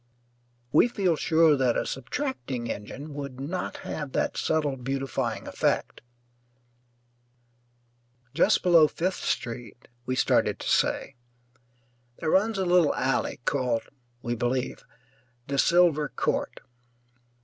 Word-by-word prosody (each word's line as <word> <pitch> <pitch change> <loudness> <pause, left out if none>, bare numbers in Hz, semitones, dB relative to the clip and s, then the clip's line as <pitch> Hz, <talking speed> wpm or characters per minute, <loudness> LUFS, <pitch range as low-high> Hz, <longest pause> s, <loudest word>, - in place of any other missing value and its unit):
We 155 - +5
feel 195 -8 +1
sure 160 0 +4
that 130 -3 +1
a - - -1
subtracting 135 - -4
engine 140 +8 -7
would 140 -2 -6
not 170 +7 -4
have 150 -4 -5
that - - 0
subtle 150 -3 0
beautifying 135 +1 -3
effect - - -1 2.3
just - - +3
below 170 -4 +6
Fifth 185 +5 -3
Street, 120 0 -4 0.2
we 130 - 0
started - - +2
to - - -7
say, 135 - +1 1.0
there 160 - -1
runs 210 +3 +2
a 190 - 0
little 175 -3 +4
alley 130 -1 -1
called 125 -5 0 0.3
(we 120 - -1
believe) 125 +2 -2 0.6
De 140 0 -2
Silver 170 -3 +4
Court. - - -2
145 Hz, 115 wpm, -27 LUFS, 130-170 Hz, 2.3 s, below